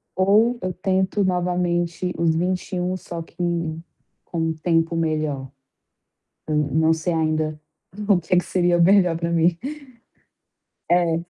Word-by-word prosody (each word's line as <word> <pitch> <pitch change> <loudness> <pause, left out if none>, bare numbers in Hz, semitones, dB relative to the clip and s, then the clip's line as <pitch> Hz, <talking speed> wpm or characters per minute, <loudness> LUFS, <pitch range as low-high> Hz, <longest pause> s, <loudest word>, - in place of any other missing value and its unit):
ou 210 +6 +3
eu 185 -1 -2
tento 190 +2 0
novamente 180 -1 0
os 165 -1 +2
21 180 +1 -1
só 170 -2 -7
que 165 - -14 0.9
com 170 - -5
um 160 0 0
tempo 165 +1 0
melhor? 155 -4 -1 1.0
Eu 155 - -1
não 150 +2 +2
sei 165 +2 -2
ainda 155 -1 -1 0.5
o 200 -4 +4
que 170 +1 -4
é - - +4
que 180 - +1
seria 175 -1 +2
melhor 180 -2 +4
para 170 0 -2
mim. 165 0 +2 1.3
É. 170 -1 +2
170 Hz, 130 wpm, -22 LUFS, 160-180 Hz, 1.3 s, o